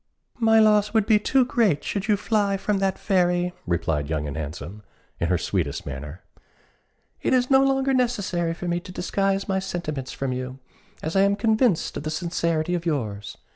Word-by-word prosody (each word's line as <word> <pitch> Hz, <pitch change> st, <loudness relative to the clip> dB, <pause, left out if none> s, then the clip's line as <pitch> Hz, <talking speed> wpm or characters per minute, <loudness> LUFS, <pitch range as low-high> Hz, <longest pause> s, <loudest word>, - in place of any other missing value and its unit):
"My 225 Hz, -1 st, +4 dB
loss 210 Hz, 0 st, +4 dB
would 220 Hz, -2 st, +4 dB
be 215 Hz, -1 st, +4 dB
too 260 Hz, +4 st, +3 dB
great 215 Hz, -, +1 dB
should 195 Hz, -1 st, -3 dB
you 210 Hz, -2 st, +3 dB
fly 205 Hz, -2 st, +1 dB
from 200 Hz, 0 st, -1 dB
that 195 Hz, -1 st, 0 dB
fairy," 180 Hz, -2 st, +1 dB
replied 80 Hz, -4 st, -1 dB
Young 75 Hz, -2 st, -2 dB
and 70 Hz, -, -5 dB
Handsome, 80 Hz, +7 st, -6 dB, 0.4 s
in 85 Hz, -, 0 dB
her 90 Hz, +1 st, +2 dB
sweetest 80 Hz, -3 st, -2 dB
manner. 70 Hz, +5 st, -7 dB, 1.0 s
"It -, -, +2 dB
is 250 Hz, +1 st, +1 dB
no 265 Hz, 0 st, +6 dB
longer 270 Hz, 0 st, +2 dB
necessary 200 Hz, -10 st, 0 dB
for 180 Hz, -, -6 dB
me 175 Hz, 0 st, 0 dB
to 180 Hz, -, -11 dB
disguise 195 Hz, +2 st, -1 dB
my 190 Hz, -1 st, +1 dB
sentiments 165 Hz, -8 st, -4 dB
from 135 Hz, -2 st, -3 dB
you, 130 Hz, +1 st, -5 dB, 0.5 s
as 160 Hz, +3 st, -3 dB
I 195 Hz, -, +5 dB
am 200 Hz, +1 st, +3 dB
convinced 220 Hz, -2 st, +1 dB
of -, -, -4 dB
the 155 Hz, -, -4 dB
sincerity 165 Hz, 0 st, -1 dB
of 175 Hz, -1 st, -1 dB
yours. 110 Hz, -11 st, -3 dB
180 Hz, 185 wpm, -24 LUFS, 130-210 Hz, 1.0 s, no